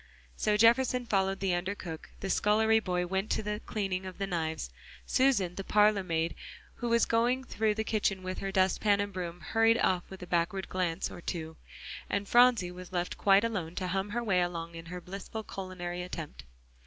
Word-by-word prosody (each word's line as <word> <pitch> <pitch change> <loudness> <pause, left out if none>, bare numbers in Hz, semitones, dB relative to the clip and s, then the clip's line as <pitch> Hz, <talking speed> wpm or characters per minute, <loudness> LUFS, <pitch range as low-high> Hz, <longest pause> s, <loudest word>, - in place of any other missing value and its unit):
So 210 0 +1
Jefferson 245 +2 +4
followed 195 -3 0
the 190 -2 +1
under 185 +3 -1
cook, 165 -5 -8
the 195 - -1
scullery 220 +3 +3
boy 180 -4 -1
went 190 +3 -2
back 215 - -1
to 210 0 -2
cleaning 190 -4 -3
the 195 - -1
knives, 160 - -3 0.3
Susan, 245 -10 +2
the 195 - -5
parlor 210 0 +4
maid 165 -2 -1 0.4
who 240 - -2
was 235 0 +4
going 240 +3 +2
through 220 -4 0
the 220 - -1
kitchen 205 -4 0
with 185 0 -4
her 195 - -3
dustpan 195 +2 +3
and 205 0 -2
broom, 175 -1 -5
hurried 225 0 +3
off 185 -5 +2
with 190 -1 -9
a - - -5
backward 175 +2 0
glance 180 -2 -1
or - - -9
two, 160 -2 -4 0.5
and 200 0 -1
Phronsie 240 -7 +5
was 180 0 -10
left 175 -1 -2
quite 200 +1 +5
alone 185 -8 -2
to 185 -1 -2
hum 195 +2 -1
her 240 +3 -2
way 190 -5 +2
along 170 -1 -3
in 165 0 -9
her 180 +1 -6
blissful 200 +4 -7
culinary 180 -3 -5
attempt. 165 - -7
190 Hz, 190 wpm, -30 LUFS, 180-215 Hz, 0.5 s, Phronsie